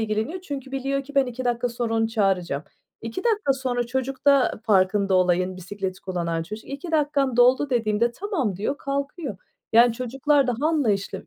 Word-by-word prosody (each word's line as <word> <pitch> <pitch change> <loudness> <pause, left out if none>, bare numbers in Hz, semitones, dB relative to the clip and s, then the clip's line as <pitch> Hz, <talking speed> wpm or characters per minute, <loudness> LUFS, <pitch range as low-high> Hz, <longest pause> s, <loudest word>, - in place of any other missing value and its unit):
ilgileniyor 220 +11 -2
çünkü 275 -6 -7
biliyor 275 +1 -1
ki 285 +1 -13
ben 275 -2 +4
2 250 +1 -5
dakika 240 0 0
sonra 235 -1 -2
onu 225 0 +1
çağıracağım. 190 -9 0 0.4
2 230 - -5
dakika 425 - +2
sonra 250 -2 -2
çocuk 265 +2 -3
da 275 -6 +4
farkında 195 -1 +3
olayın, 185 0 +2
bisikleti 190 +1 -5
kullanan 170 -3 -2
çocuk, 215 +6 -8
"2 280 +5 -6
dakikan 285 -4 +1
doldu." 255 +3 +4
dediğimde, 230 0 +1
"Tamam." 300 - -2
diyor, 245 +8 -2
kalkıyor. 280 - -4 0.4
Yani 235 +1 +6
çocuklar 270 +4 +1
daha 245 +5 0
anlayışlı 210 - -1
245 Hz, 165 wpm, -24 LUFS, 205-275 Hz, 0.4 s, Yani